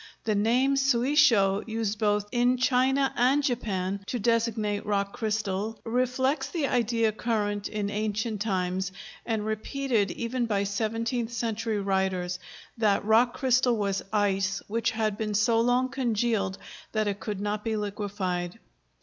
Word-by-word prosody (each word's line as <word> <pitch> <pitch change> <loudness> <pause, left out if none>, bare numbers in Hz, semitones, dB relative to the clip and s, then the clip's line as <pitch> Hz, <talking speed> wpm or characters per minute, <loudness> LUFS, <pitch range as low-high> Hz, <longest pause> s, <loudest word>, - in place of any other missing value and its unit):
The 220 - +1
name 240 +7 +2
suisho, 245 -6 +4
used 220 -2 -2
both 210 -1 +1
in 245 +1 +2
China 265 +2 +2
and 265 +4 +3
Japan 200 -7 -1
to 250 - -2
designate 220 -2 0
rock 200 -1 -1
crystal, 215 -1 -2
reflects 260 +3 0
the 325 -5 -1
idea 230 -3 +1
current 205 -2 -1
in 205 -1 -3
ancient 215 0 -2
times, 190 -2 -1 0.4
and 220 -3 -1
repeated 220 0 -1
even 235 +4 -2
by 200 -3 +1
seventeenth 225 +4 -2
century 225 -2 -2
writers, 190 -2 -1 0.4
that 205 -3 +2
rock 230 +3 +4
crystal 255 -2 +2
was 200 -2 -1
ice 195 -2 +1
which 230 +2 0
had 215 -2 -1
been 210 -1 -2
so 225 +2 +3
long 245 +2 +2
congealed 235 -6 0 0.4
that 215 -1 +1
it 200 0 -2
could 205 -2 -4
not 210 +1 -2
be 225 -1 -1
liquefied. 200 -3 -3
220 Hz, 140 wpm, -27 LUFS, 205-240 Hz, 0.4 s, suisho